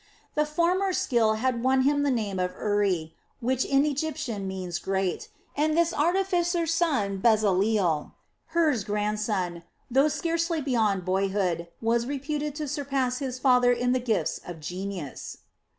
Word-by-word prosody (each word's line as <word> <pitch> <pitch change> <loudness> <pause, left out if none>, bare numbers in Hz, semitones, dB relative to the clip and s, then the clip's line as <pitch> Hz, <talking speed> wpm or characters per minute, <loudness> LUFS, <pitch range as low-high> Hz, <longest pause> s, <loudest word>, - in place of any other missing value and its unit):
The 300 0 +1
former's 360 +5 +1
skill 225 -4 +2
had 240 +1 0
won 260 +1 +3
him 285 +1 +2
the 285 - +2
name 210 -7 -1
of 180 0 -1
Uri, 195 -6 0 0.3
which 255 +2 0
in 275 +1 +3
Egyptian 285 -8 -2
means 185 -3 -4
'great', 190 -1 -2 0.3
and 310 +2 +1
this 340 0 +3
artificer's 345 0 +1
son 260 - 0
Bezaleel, 200 -6 +2 0.3
Hur's 320 -9 +1
grandson, 210 -4 -1 0.3
though 270 +4 +4
scarcely 335 +2 -1
beyond 220 -9 0
boyhood, 190 -2 0 0.2
was 235 +1 +1
reputed 290 +1 -3
to 300 -1 -4
surpass 270 -3 -1
his 260 -3 -3
father 250 -2 +4
in 245 0 +1
the 255 - +2
gifts 230 -5 -1
of 175 -2 -8
genius. 180 -2 -6
245 Hz, 140 wpm, -27 LUFS, 200-295 Hz, 0.3 s, though